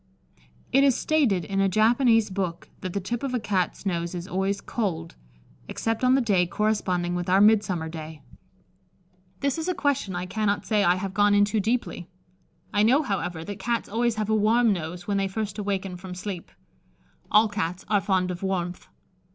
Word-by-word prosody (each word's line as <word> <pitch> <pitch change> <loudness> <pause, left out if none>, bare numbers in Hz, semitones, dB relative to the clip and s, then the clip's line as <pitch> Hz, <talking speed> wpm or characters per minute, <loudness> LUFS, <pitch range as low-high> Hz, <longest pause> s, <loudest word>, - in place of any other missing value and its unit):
It 275 +2 +5
is 275 -3 +4
stated 245 - +1
in 195 +3 -2
a 195 - +3
Japanese 225 +1 +3
book 185 -3 -3
that 185 -1 -5
the 200 - -1
tip 225 +5 -4
of 270 -2 -2
a - - +1
Cat's 195 -3 -1
nose 170 -2 -2
is 175 +1 -5
always 195 +1 -1
cold, 170 -9 -3 0.5
except 225 +1 -2
on 255 +1 +5
the 270 - +3
day 195 -7 +2
corresponding 185 -4 0
with 175 0 -3
our 190 +1 +5
Midsummer 200 -6 +3
day. 160 -1 -8 1.2
This 280 +3 0
is 320 - -3
a 365 - 0
question 280 -12 0
I 175 +1 -3
cannot 205 +1 -1
say 210 -2 +2
I 175 0 +4
have 190 +1 -4
gone 205 0 +4
into 205 +2 +3
deeply. 220 -4 -2 0.7
I 205 - +3
know, 255 +8 +4
however, 180 - -3
that 200 +3 -7
Cats 235 -1 -1
always 235 +2 0
have 215 0 -2
a - - +4
warm 220 +1 +3
nose 175 0 -5
when 200 -1 0
they 195 0 +1
first 210 +1 -4
awaken 195 -2 -2
from 180 0 -8
sleep. 180 -1 -6 0.8
All 215 +1 +5
Cats 185 -4 -3
are 205 -2 +2
fond 185 -2 +1
of 180 - -6
warmth. 180 -2 -3
200 Hz, 185 wpm, -25 LUFS, 180-220 Hz, 1.2 s, It